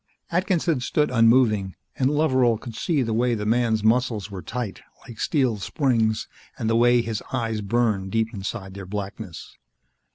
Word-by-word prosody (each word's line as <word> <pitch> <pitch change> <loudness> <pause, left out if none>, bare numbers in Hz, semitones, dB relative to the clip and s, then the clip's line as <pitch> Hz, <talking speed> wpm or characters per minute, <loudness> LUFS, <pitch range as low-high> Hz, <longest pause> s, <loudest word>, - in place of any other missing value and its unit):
Atkinson 170 -4 +1
stood 150 +4 0
unmoving, 115 -5 +3 0.2
and 130 0 +2
Loveral 130 -6 +3
could 115 +1 -9
see 145 +4 0
the 115 -2 -2
way 120 +1 +2
the 105 -1 -4
man's 115 -1 +1
muscles 110 -2 +1
were 95 -2 -6
tight, 115 +2 -5 0.3
like 115 -2 -11
steel 130 -7 +1
springs, 110 0 0 0.3
and 110 - -2
the 115 - +2
way 120 0 +4
his 110 -2 -3
eyes 115 -4 -1
burned 105 -3 0
deep 115 +1 0
inside 95 -1 -5
their 95 -1 -8
blackness. 100 -2 -7
115 Hz, 160 wpm, -24 LUFS, 105-125 Hz, 0.3 s, way